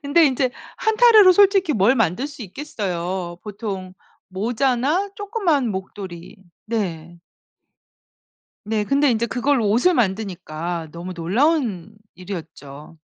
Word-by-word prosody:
근데 315 +4 +4
인제 260 -1 +1 0.3
한 440 -1 0
타래로 435 -6 +7
솔직히 390 -3 +4
뭘 215 +2 +3
만들 225 - 0
수 285 -5 -10
있겠어요. 185 - -4
보통 195 -3 -6 0.3
모자나 255 - 0
조그만 390 - 0
목도리. 190 -3 -7 0.3
네. 175 -7 -4 1.5
네 215 -1 0
근데 280 +3 +2
인제 230 0 0
그걸로 245 -1 +1
옷을 245 - +3
만드니까 175 - -2
너무 175 +3 -7
놀라운 210 - 0 0.2
일이었죠. 165 -5 -9
220 Hz, 245 characters per minute, -21 LUFS, 185-285 Hz, 1.5 s, 타래로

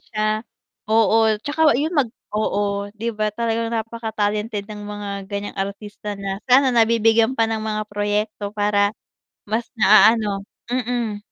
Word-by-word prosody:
siya. 215 0 -1 0.5
Oo, 220 0 +4
'tsaka 300 -2 +3
yun 305 +5 -1
mag 285 -7 +2 0.2
oo, 205 -1 -1
'di 230 +2 -2
ba, 215 0 -1
talagang 230 0 -1
napaka 225 -1 -4
talented 210 0 -1
ng 210 0 -9
mga 205 0 -6 0.2
ganiyang 200 0 -5
artista 205 +1 -5
na 195 0 -4
sana 260 +1 +5
nabibigyan 230 +1 +3
pa 225 - +3
ng 225 -1 -2
mga 215 -1 -2
proyekto 205 0 -1
para 205 -1 +2 0.5
mas 220 +3 -2
na-aano 215 -1 +4 0.2
mm. 240 -3 -1
215 Hz, 140 wpm, -21 LUFS, 205-230 Hz, 0.5 s, sana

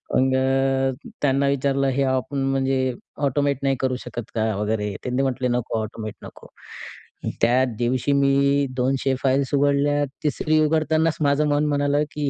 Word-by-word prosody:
मग 130 0 +3
अ, 135 0 0
त्यांना 140 0 +2
विचारलं 140 0 +1
"हे 140 - +1
आपण 130 +1 -1
म्हणजे 130 -1 0 0.3
ऑटोमॅट 140 0 0
नाही 135 -1 +2
करू 130 -1 0
शकत 120 - -5
का?" 110 - +1
वगैरे 105 0 -2
त्यांनी 125 +1 -1
म्हटले 130 -1 -1
"नको. 120 -2 -1
ऑटोमॅट 110 0 -6
नको." - - -12 0.9
त्या 125 +3 +4
दिवशी, 125 +3 0
मी 140 0 +3
200 135 +1 0
फाइल्स 135 +1 +1
उघडल्या. 145 +1 +2 0.2
तिसरी 155 +2 +1
उघडतानाच 160 +1 +1
माझं 145 +1 +2
मन 145 +1 +2
म्हणालं, 145 0 +1
की 145 -2 -2
135 Hz, 145 wpm, -23 LUFS, 130-140 Hz, 0.9 s, त्या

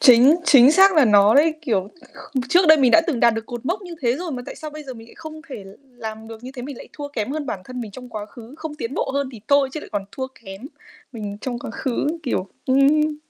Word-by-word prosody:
Chính 255 +3 +7
chính 270 -1 +7
xác 385 +2 +6
là 300 -4 +6
nó 205 -1 +5
đấy, 310 +2 +4
kiểu, 205 -8 -1 0.5
kh 260 - +1
trước 355 +3 +4
đây 315 - +9
mình 255 -3 +4
đã 330 - +7
từng 275 -9 -1
đạt 235 -1 +5
được 225 0 -5
cột 240 0 -7
mốc 385 +3 -2
như 350 -2 -8
thế 240 +2 +1
rồi 345 -2 -5
mà 250 -1 -5
tại - - -7
sao 310 -1 -7
bây 305 0 -9
giờ 260 -2 -8
mình 225 0 -13
lại - - -17
không 315 -1 -10
thể 210 -7 -8
l - - -12 0.3
làm 220 0 -7
được 225 +1 -10
như 255 - -7
thế, 245 - -7
mình 275 -1 -7
lại - - -11
thua 290 -1 -7
kém 240 -3 -4
hơn 300 -2 -4
bản 195 -6 -4
thân 250 +3 -7
mình 220 -3 -6
trong 250 +4 -11
quá 215 -2 -6
khứ, 235 +3 -13
không 315 -2 -6
tiến 270 -3 -5
bộ - - -1
hơn 280 -1 -1
thì 220 - -11
thôi 280 -1 +4
chứ 305 - -5
lại - - -11
còn 200 -1 -2
thua 260 -1 -4 0.2
kém 195 +1 -9 0.5
mình 205 -3 -6
trong 245 -2 -4
quá 225 - -7
khứ, 260 +3 -2 0.2
kiểu 200 -8 -2 0.2
ừm. 295 +3 +3
255 Hz, 280 wpm, -21 LUFS, 225-300 Hz, 0.5 s, đây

